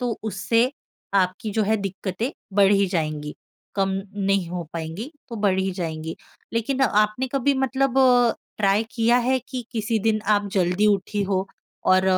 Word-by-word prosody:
तो 245 -1 -1 0.2
उससे 230 +6 +2 0.5
आपकी 185 +4 -3
जो 215 - +4
है 220 +2 +2
दिक़्क़तें 195 +4 -3 0.3
बढ़ 195 0 +6
ही 200 -1 +4
जाएँगी, 155 -2 -2 0.4
कम 195 -1 +1 0.3
नहीं 195 -3 +1
हो 175 0 -3
पाएँगी 165 - -5 0.2
तो 230 - -6
बढ़ 190 -1 +2
ही 190 0 0
जाएँगी। 160 -1 -4 0.4
लेकिन 245 +4 -1
आपने 215 +2 +2
कभी 275 +1 +2
मतलब 265 0 +1
अ, 245 -3 +5 0.2
ट्राई 205 +1 +3
किया 235 +1 +3
है 260 +1 +2
कि 255 -2 -5
किसी 225 -1 0
दिन 215 -1 +2
आप 205 0 0
जल्दी 185 +2 +2
उठी 205 0 +1
हो 190 -1 0 0.5
और 185 0 +4
205 Hz, 165 wpm, -24 LUFS, 185-235 Hz, 0.5 s, बढ़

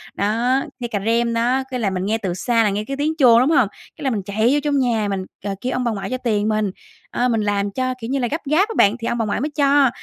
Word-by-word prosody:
đó, 235 +6 +1 0.2
nghe 240 - -3
cà 210 -4 -2
rem 235 +1 +1
đó, 245 +3 +1
cái 255 - -2
là 210 -4 +1
mình 185 0 -3
nghe 220 +2 +1
từ 190 -5 -3
xa 230 +5 +1
là 210 - +2
nghe 205 +2 -2
cái 275 +3 -5
tiếng 300 +2 0
chuông, 240 -5 +6
đúng 260 +5 +3
hông? 220 - +4 0.3
Cái 310 - -9
là 265 - +1
mình 210 -5 -2
chạy 215 +4 +1
vô 295 - +3
trong 290 -2 +1
nhà 230 -5 +1
mình, 190 -1 -3 0.2
ờ, 195 -1 -2
kêu 255 - -2
ông 250 - -1
bà 235 - 0
ngoại 205 +1 -4
cho 255 - -2
tiền 215 -4 0
mình, 215 -2 0 0.4
ơ, 245 +1 +1
mình 225 -2 +1
làm 205 -1 0
cho 255 +2 -1
kiểu 225 - -5
như 275 - 0
là 245 - 0
gấp 315 +6 -3
gáp 385 +8 +3
á 450 - -4
bạn, 205 +3 +5
thì 230 - -4
ông 235 - -1
bà 225 - 0
ngoại 210 +2 -2
mới 295 - -1
cho, 280 -2 +4
235 Hz, 305 wpm, -20 LUFS, 210-260 Hz, 0.4 s, chuông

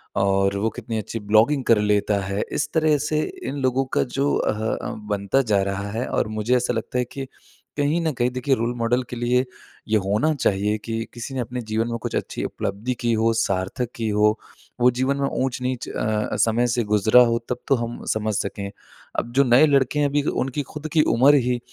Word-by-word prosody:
और 100 0 +2
वो 110 +3 0
कितनी 115 -2 -5
अच्छी 115 +1 -4
ब्लॉगिंग 110 +7 +3
कर 115 - +5
लेता 105 0 +2
है? 100 +1 -2
इस 150 - -1
तरह 155 -2 +3
से 155 +1 0 0.3
इन 145 - -4
लोगों 130 +1 +1
का - - +4
जो 140 +3 -1
अह, 105 - 0 0.2
अ, - - -5 0.2
बनता 100 +6 +1
जा 100 - +4
रहा 100 +1 -3
है 115 +4 -3
और - - 0
मुझे 120 +4 +2
ऐसा 125 0 0
लगता 115 +2 -3
है 125 - +1
कि 135 -1 -6 0.5
कहीं 145 +4 +1
न - - +1
कहीं 120 0 +1
देखिए 130 +2 +1
रोल 115 +1 -1
मॉडल 120 +2 +1
के 125 - -5
लिए 125 +2 +1 0.4
ये 110 - +4
होना 110 +11 +2
चाहिए 105 -3 +1
कि 115 0 -3
किसी 120 +3 -7
ने - - -2
अपने 125 +1 -4
जीवन 110 +2 0
में 115 - -2
कुछ - - -3
अच्छी - - -4
उपलब्धि 105 +6 -3
की 120 -1 +1
हो, 115 +1 +2
सार्थक 110 +3 -1
की 115 -2 -2
हो। 105 +1 +3 0.4
वो 125 - +7
जीवन 130 +3 0
में 140 0 0
ऊँच-नीच 130 -1 -2
अ, 110 -1 -1
समय 115 +2 +2
से 120 0 0
गुज़रा 105 +3 +5
हो 115 0 +1
तब 125 0 -2
तो 135 - +4
हम 120 0 -5
समझ 110 0 -1
सकें। 100 0 -3 0.5
अब 120 - -5
जो 140 +1 +5
नए 125 +5 +6
लड़के 140 0 +2
हैं, 145 - +3
अभी 145 0 +1
उनकी 135 0 -1
ख़ुद 150 +1 -5
की 155 - +5
उम्र 135 +5 +6
ही 125 -1 +1
120 Hz, 215 wpm, -23 LUFS, 110-130 Hz, 0.5 s, वो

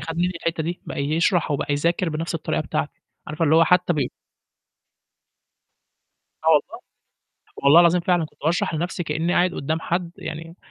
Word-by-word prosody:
خَد 165 0 -6
مني 180 +1 +1
الحتة 165 -1 -2
دي، 170 +3 -4
بقى - - -6
يشرح 165 +4 +1
أو 145 - +1
بقى 145 - -2
يذاكر 170 +4 0
بنَفْس 165 +2 -3
الطريقة 165 - -2
بتاعتي 145 0 -3 0.3
عارفة 155 +2 -2
اللي 155 +1 +3
هو 165 +1 +6
حتى 180 +1 +3
بي 145 -6 -1 2.4
آه - - +3
والله. - - +2 0.8
والله 140 +5 +7
العظيم 175 +1 +4
فعلًا 175 -1 +1
كنت 155 - -14
باشرح 165 +1 0
لنَفْسي 175 +3 -3
كأني 165 +3 -1
قاعد 180 0 +2
قدّام 160 +3 -2
حد 170 +1 -2
يعني 165 +2 -8
165 Hz, 170 wpm, -23 LUFS, 155-175 Hz, 2.4 s, والله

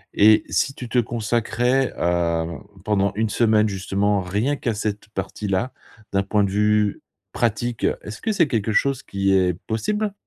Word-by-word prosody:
et 110 +1 +6
si 135 - 0
tu 125 - -7
te 125 - +2
consacrais, 120 +3 0
heu, 85 -1 0 0.3
pendant 100 -2 +2
1 110 0 0
semaine, 110 -2 +3
justement, 100 +1 0
rien 105 +10 -1
qu'à 120 -5 -2
cette 105 0 -4
partie-là, 105 +3 -3 0.4
d'un 100 - +3
point 105 +1 +1
de 95 - -1
vue 105 0 +2 0.3
pratique, 120 +1 -1 0.2
est-ce 110 +2 -8
que 220 - 0
c'est 170 -7 +3
quelque 110 -3 -1
chose 135 +3 +1
qui 95 -3 0
est 90 -2 +3
possible? 205 - -1
105 Hz, 160 wpm, -22 LUFS, 100-120 Hz, 0.4 s, et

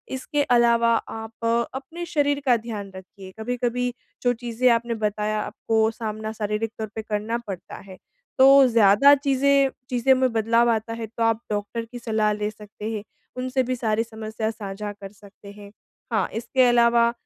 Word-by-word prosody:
इसके 290 +2 -1
अलावा 235 -1 +4
आप 225 0 -6
अ, 230 +1 +2
अपने 320 +6 -6
शरीर 285 -3 0
का 250 -2 +5
ध्यान 215 -3 -7
रखिए, 190 0 -12
कभी-कभी 245 +1 -2 0.3
जो 245 - +3
चीजें 240 +1 +1
आपने 235 0 -4
बताया 210 +1 -2
आपको 220 +1 0
सामना 220 -1 -5
शारीरिक 210 +1 -2
तौर 220 - -3
पर 220 - -3
करना 215 +3 -1
पड़ता 190 -3 -7
है 185 - -10 0.4
तो 265 - +8 0.2
ज़्यादा 230 +4 +6
चीजें 275 0 +2 0.2
चीजें 250 +1 +3
में 260 -1 +1
बदलाव 230 +1 +3
आता 225 0 -2
है 230 -1 -5
तो 230 +1 -4
आप 225 0 +1
डॉक्टर 210 +3 -3
की 245 +1 -10
सलाह 220 -2 0
ले 210 0 -2
सकते 210 +1 -8
हैं, 215 -2 -4 0.3
उनसे 255 +1 0
भी 255 +1 -2
सारी 225 -2 0
समस्या 220 -1 -5
साझा 205 -1 -6
कर 200 -1 -11
सकते 200 -1 -15
हैं, 205 0 -13 0.4
हाँ, 220 - +1
इसके 240 +3 +1
अलावा 235 -1 +4
225 Hz, 170 wpm, -24 LUFS, 215-245 Hz, 0.4 s, तो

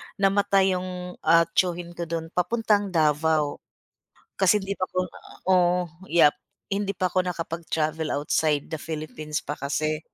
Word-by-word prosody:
namatay 195 -1 +3
'yung, 180 0 -6
ah, 165 +1 +7
tiyuhin 175 -1 0
ko 170 0 -5
do'n 165 0 -4
papuntang 205 +2 +1
Davao. 155 -1 +2 0.8
Kasi 190 +2 +5
hindi 195 0 -3
pa 185 - 0
ako - - -4 0.5
oo, 180 -1 +4 0.3
yup. 160 -3 +6 0.4
Hindi 200 -1 -1
pa 185 -1 0
ako 185 - +3
nakapag-travel 160 -2 -2
outside 150 0 +1
the 160 - -3
Philippines 155 -1 -5
pa 145 - -3
kasi. 155 +2 -1
170 Hz, 135 wpm, -25 LUFS, 155-185 Hz, 0.8 s, ah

